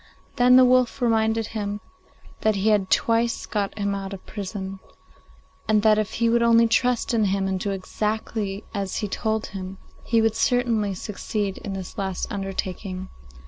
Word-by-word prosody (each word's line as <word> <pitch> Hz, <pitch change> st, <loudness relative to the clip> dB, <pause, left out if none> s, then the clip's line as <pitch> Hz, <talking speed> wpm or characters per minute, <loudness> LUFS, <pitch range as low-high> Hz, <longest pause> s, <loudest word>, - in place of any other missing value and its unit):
Then 250 Hz, +1 st, +6 dB
the 255 Hz, 0 st, +8 dB
wolf 255 Hz, 0 st, +3 dB
reminded 225 Hz, -2 st, +2 dB
him 205 Hz, -1 st, -3 dB, 0.6 s
that 220 Hz, -1 st, +2 dB
he 200 Hz, +2 st, +1 dB
had 205 Hz, -3 st, +2 dB
twice 230 Hz, 0 st, +1 dB
got 205 Hz, -1 st, -2 dB
him 200 Hz, -1 st, -1 dB
out 195 Hz, 0 st, -4 dB
of 190 Hz, -, -9 dB
prison, 195 Hz, -1 st, -6 dB, 0.9 s
and 215 Hz, -1 st, +3 dB
that 215 Hz, -1 st, +5 dB
if 215 Hz, -, -2 dB
he 235 Hz, -, +1 dB
would 235 Hz, +1 st, +3 dB
only 230 Hz, 0 st, +5 dB
trust 245 Hz, +1 st, +1 dB
in 220 Hz, -2 st, +3 dB
him, 195 Hz, 0 st, 0 dB
and 190 Hz, -1 st, -1 dB
do 200 Hz, -, -2 dB
exactly 210 Hz, +1 st, -3 dB
as 200 Hz, -3 st, -3 dB
he 210 Hz, -, -1 dB
told 220 Hz, +2 st, -1 dB
him, 190 Hz, 0 st, -6 dB, 0.3 s
he 230 Hz, -, +2 dB
would 225 Hz, -1 st, +3 dB
certainly 230 Hz, -6 st, +1 dB
succeed 205 Hz, 0 st, -3 dB
in 200 Hz, -, -6 dB
this 190 Hz, +2 st, -6 dB
last 190 Hz, -2 st, -3 dB
undertaking. 190 Hz, -1 st, -4 dB
210 Hz, 170 wpm, -24 LUFS, 195-225 Hz, 0.9 s, the